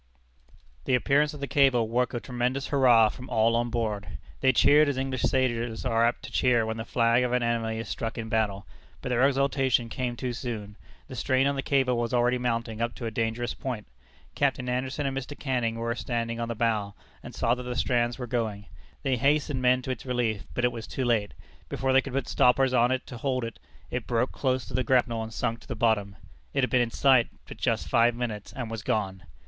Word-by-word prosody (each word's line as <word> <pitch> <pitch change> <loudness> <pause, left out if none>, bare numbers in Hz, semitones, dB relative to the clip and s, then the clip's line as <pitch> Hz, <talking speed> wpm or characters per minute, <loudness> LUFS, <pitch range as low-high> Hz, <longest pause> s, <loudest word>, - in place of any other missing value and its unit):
The 125 - +3
appearance 145 +4 +2
of 145 - -10
the - - -1
cable 135 -6 +3
woke 125 +2 0
a - - -1
tremendous 125 +2 -2
hurrah 120 -6 +5
from 125 +4 -9
all 115 +1 +3
on 120 0 0
board. 110 -4 -3 0.2
They 130 - +4
cheered 145 +4 +5
as 140 - -2
English 130 -1 -2
sailors 120 -3 0
are 115 -2 +2
apt 120 +1 +1
to - - -8
cheer 120 -3 +3
when 110 0 -3
the 110 - -5
flag 115 0 +2
of 125 0 -1
an 125 -1 +2
enemy 115 -1 -1
is 115 -1 -5
struck 115 +2 -4
in 115 -1 -4
battle. 105 -3 -1 0.4
But - - -3
their 125 -1 +1
exultation 135 -3 +1
came 125 0 -3
too 125 0 -3
soon. 110 -4 -5 0.3
The 130 - -8
strain 130 +1 +1
on 140 0 +1
the 135 - -1
cable 130 -3 +1
was 120 +1 -1
already 125 +1 +2
mounting 115 -2 -2
up 115 0 -1
to 120 - -6
a 115 - -2
dangerous 115 +2 -2
point. 125 -5 -5 0.5
Capt. - - +1
Anderson 130 +3 -2
and 135 -1 -1
Mr. 135 +2 -5
Canning 125 -5 -1
were 115 0 -2
standing 115 -1 -3
on 115 - -2
the 115 - -3
bow, 110 -3 0 0.3
and - - -10
saw 115 - +2
that 125 - -3
the 125 0 -5
strands 120 -2 +1
were 125 - -4
going. 110 -4 -2 0.4
They 135 -2 +1
hastened 145 +1 +1
men 125 0 +3
to 130 - -3
its 125 - -5
relief, 120 -5 -1
but 120 - +1
it 125 - +2
was 115 -1 -7
too 130 - -3
late. 110 -4 0 0.3
Before 135 -1 0
they 135 - +6
could 135 - -8
put 135 -2 -1
stoppers 130 +1 +3
on 120 -1 +4
it 130 0 -1
to 125 - -8
hold 130 0 -1
it, 115 0 -6 0.3
it 125 -2 -3
broke 120 +1 +1
close 130 -2 -1
to - - -11
the 130 +2 +1
grapnel, 120 -3 +2
and 110 0 -6
sunk 115 +1 -2
to - - -18
the 125 - -4
bottom. 105 -3 +1 0.4
It 135 - +2
had 125 - 0
been 125 - +4
in 120 - +1
sight 130 -1 +4 0.2
but - - -9
just - - -1
five 120 0 +3
minutes, 115 -4 -4
and 120 -4 -6
was 115 -2 -4
gone. 100 -6 -2
120 Hz, 230 wpm, -27 LUFS, 115-130 Hz, 0.5 s, they